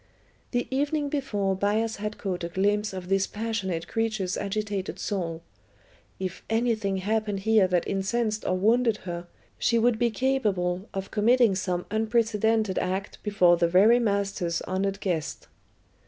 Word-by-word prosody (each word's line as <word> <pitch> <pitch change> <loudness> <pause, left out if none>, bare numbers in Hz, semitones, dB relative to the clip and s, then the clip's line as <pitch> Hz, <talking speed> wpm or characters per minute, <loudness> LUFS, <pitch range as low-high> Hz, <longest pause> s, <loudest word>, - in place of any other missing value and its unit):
The 245 -1 -1
evening 290 +1 0
before 210 -10 -1
Bias 215 +3 0
had 210 +1 -4
caught 180 -3 -3
a 170 - -3
glimpse 205 +3 +1
of 185 -2 -7
this 195 0 +2
passionate 205 -6 -3
creature's 215 -5 -1
agitated 205 -1 -3
soul. 165 -5 -3 0.8
If 185 -2 -4
anything 225 -4 +1
happened 210 0 -1
here 215 -2 +4
that 180 -1 0
incensed 215 +2 -1
or 185 - 0
wounded 225 +3 +3
her 175 -1 -5 0.3
she 235 - +2
would 230 -1 +2
be 240 -1 +3
capable 205 -7 0
of 195 0 -5
committing 230 0 +4
some 180 -2 -2
unprecedented 220 -2 +1
act 190 +2 -3
before 185 -5 +4
the 170 - +3
very 205 +8 +5
master's 200 -6 -1
honoured 195 +1 -2
guest. 170 -5 -3
205 Hz, 140 wpm, -26 LUFS, 185-225 Hz, 0.8 s, very